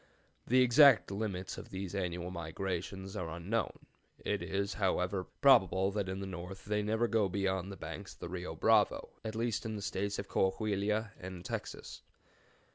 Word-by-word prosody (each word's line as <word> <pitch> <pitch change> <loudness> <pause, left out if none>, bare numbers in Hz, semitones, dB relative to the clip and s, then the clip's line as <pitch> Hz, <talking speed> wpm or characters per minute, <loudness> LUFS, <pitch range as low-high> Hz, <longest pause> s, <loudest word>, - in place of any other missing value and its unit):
The 130 +1 +6
exact 125 -2 +7
limits 100 -3 -3
of - - -10
these 95 -1 -5
annual 90 -2 -2
migrations 95 +3 -4
are 85 -2 -3
unknown; 90 +7 -2 0.4
it - - 0
is, 100 +1 -1
however, 95 -1 0 0.2
probable 95 - +5
that 100 -2 -2
in 95 +1 -3
the 100 - -4
north 95 +1 -7
they 105 0 0
never 110 +3 +1
go 110 -4 +2
beyond 95 0 -1
the 100 - -8
banks 85 +5 -7
of - - -23
the - - -5
Rio 90 0 -5
Bravo, - - +3
at 110 -1 -4
least 115 -1 -1
in 110 -1 -3
the 105 - -5
States 100 +1 -2
of 100 - -4
Cohahuila 105 +2 0
and 90 -1 -8
Texas. - - -5
95 Hz, 170 wpm, -33 LUFS, 90-105 Hz, 0.4 s, exact